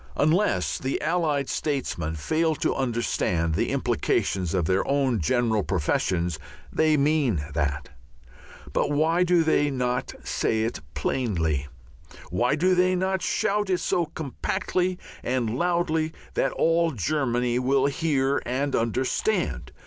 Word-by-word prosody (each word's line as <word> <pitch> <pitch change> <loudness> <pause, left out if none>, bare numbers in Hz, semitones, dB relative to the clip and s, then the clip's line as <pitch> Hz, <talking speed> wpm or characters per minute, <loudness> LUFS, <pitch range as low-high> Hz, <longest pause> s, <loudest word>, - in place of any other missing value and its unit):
Unless 170 +8 +1
the 135 0 -2
Allied 155 -4 0
statesmen 105 - -2
fail 160 - 0
to - - 0
understand 115 -10 0
the 80 - 0
implications 90 -2 0
of 90 -4 +1
their 95 +3 +2
own 135 -5 +1
general 110 - +1
professions 85 -1 0 0.3
they 155 -1 +3
mean 140 - +1
that. 70 -1 -1 0.8
But - - +1
why 160 +4 +2
do 175 -1 +3
they 145 -2 +2
not 125 -2 -2
say 110 -1 0
it 115 -7 -2 0.2
plainly? 80 - -1 0.6
Why 120 +10 +2
do 180 +4 +2
they 185 +1 +3
not 190 0 0
shout 205 0 0
it 185 - +2
so 175 -1 0
compactly 180 +5 -2 0.2
and 120 -3 -1
loudly 160 0 0 0.2
that - - +1
all 165 +1 +2
Germany 125 - 0
will 135 +1 +2
hear 140 -2 +1
and 135 +3 -1
understand? 130 - -1
135 Hz, 125 wpm, -25 LUFS, 110-160 Hz, 0.8 s, they